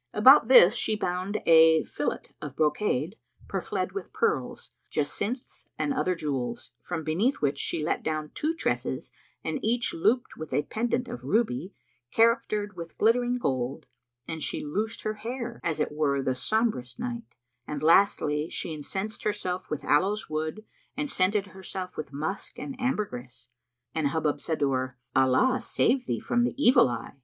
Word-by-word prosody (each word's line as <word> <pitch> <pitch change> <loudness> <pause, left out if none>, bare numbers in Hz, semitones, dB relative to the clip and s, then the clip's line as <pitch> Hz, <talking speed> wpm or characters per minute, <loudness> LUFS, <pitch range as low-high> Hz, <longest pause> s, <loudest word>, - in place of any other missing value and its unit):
About 255 +3 +8
this 220 -6 +8
she 220 -2 0
bound 185 +1 -2
a 160 -1 +7
fillet 150 - -4
of 140 -3 -6
brocade, 155 - 0 0.3
purfled - - -2
with 400 - -6
pearls, 450 +1 -1 0.2
jacinths 200 - -3
and 285 - 0
other 185 -8 0
jewels, 135 -8 -3
from 170 -3 -4
beneath 185 - +1
which 140 -1 -1
she 155 - -1
let 160 - 0
down 155 -1 -3
two 315 +2 -1
tresses[FN#327] 295 - -4
each 240 +2 0
looped 235 +9 +1
with 155 -1 -7
a 145 - +2
pendant 240 +2 -1
of 245 0 -7
ruby, 200 - 0 0.4
charactered 225 -3 +2
with 170 -1 -8
glittering 245 +3 +3
gold, 130 - -2 0.4
and 160 -1 -5
she - - -3
loosed 210 +9 -3
her 215 - -1
hair, 235 +1 -5
as 160 -2 -1
it 150 - 0
were 140 -2 0
the 130 - +1
sombrest 170 - -1
night; 235 -1 -5 0.3
and 150 -1 -4
lastly 155 -3 +3
she 165 - -3
incensed 190 +8 -4
herself 185 -3 -2
with 150 -1 -3
aloes 195 +10 +2
wood 155 +7 -3 0.3
and 290 0 -2
scented 195 +2 +2
herself 190 -1 -7
with 150 - -6
musk 155 +7 -4
and 275 - -6
ambergris, 165 - -3 0.4
and 155 -3 +1
Hubub 155 0 -1
said 160 - -1
to 140 -1 +3
her, 130 0 -2 0.2
"Allah 130 - +4
save 245 +1 +1
thee - - -1
from 240 0 +1
the 245 - 0
evil 255 - +6
eye!" 120 - -6
185 Hz, 160 wpm, -27 LUFS, 150-230 Hz, 0.4 s, About